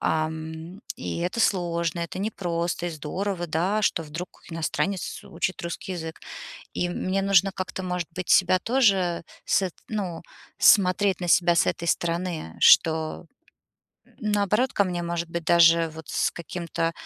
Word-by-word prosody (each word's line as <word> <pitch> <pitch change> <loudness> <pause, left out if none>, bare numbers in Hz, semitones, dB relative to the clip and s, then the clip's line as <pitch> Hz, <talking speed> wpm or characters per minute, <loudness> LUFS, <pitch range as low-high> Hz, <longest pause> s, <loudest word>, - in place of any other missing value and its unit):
ам, 160 +3 -3 0.2
и 245 - -4
это 180 +6 -2
сложно, 170 -4 0
это 170 +2 -5
непросто 175 -4 -2
и - - -2
здорово, 175 +4 -3
да, 180 +7 0
что 175 - +1
вдруг 165 +3 -6 0.2
иностранец 170 +3 -2
учит 180 +2 -3
русский 170 +2 -5
язык. 160 -2 -6 0.5
И 175 - 0
мне 185 +2 -1
нужно 195 0 +4
как-то, 185 0 -4
может 180 -2 -3
быть, 185 0 -5
себя 185 0 +5
тоже 195 -9 +2 0.2
с - - +3
эт 185 - -2 0.2
ну, 190 -6 -3 0.4
смотреть 190 -1 +4
на 175 - -3
себя 175 0 +4
с - - +4
этой 170 - -2
стороны, 170 - -2
что, 160 +1 +4 1.0
наоборот, 210 +3 +1
ко 200 - +2
мне, 175 -2 -3
может 170 0 -3
быть, 170 -1 -4
даже 165 0 +5
вот 160 -2 -10
с - - +1
каким-то 170 0 -3
175 Hz, 150 wpm, -25 LUFS, 165-190 Hz, 1.0 s, себя